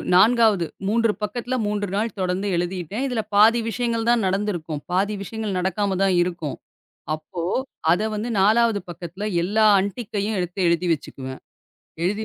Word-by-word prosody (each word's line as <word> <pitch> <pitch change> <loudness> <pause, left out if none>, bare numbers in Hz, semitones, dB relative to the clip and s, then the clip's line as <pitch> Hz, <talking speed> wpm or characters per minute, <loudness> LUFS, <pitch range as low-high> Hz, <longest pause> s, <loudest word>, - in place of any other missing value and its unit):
4ஆவது 215 -2 +5 0.2
3 230 +1 +3
பக்கத்துல 240 +4 -2
3 205 0 -1
நாள் 215 +1 -1
தொடர்ந்து 185 +2 -1
எழுதிட்டேன். 180 - -2
இதுல 245 -4 -1
பாதி 220 +3 +6
விஷயங்கள் 230 0 -1
தான் 240 -2 +3
நடந்துருக்கும். 185 -6 -2
பாதி 200 +3 +1
விஷயங்கள் 215 -1 -3
நடக்காம 190 +1 0
தான் 190 -2 +3
இருக்கும். 170 -5 -3 0.6
அப்போ, 155 +2 -6 0.5
அத 175 +4 +3
வந்து 215 +3 -3
4ஆவது 220 +1 +4
பக்கத்துல 175 +4 -6 0.2
எல்லா 215 +5 +3
அன்டிக்கையும் 205 +1 -3
எடுத்து 180 +1 -4
எழுதி 170 +1 +1
வச்சுக்குவேன். 130 -4 -6 0.6
எழுதி 205 +5 0
200 Hz, 135 wpm, -23 LUFS, 180-220 Hz, 0.6 s, பாதி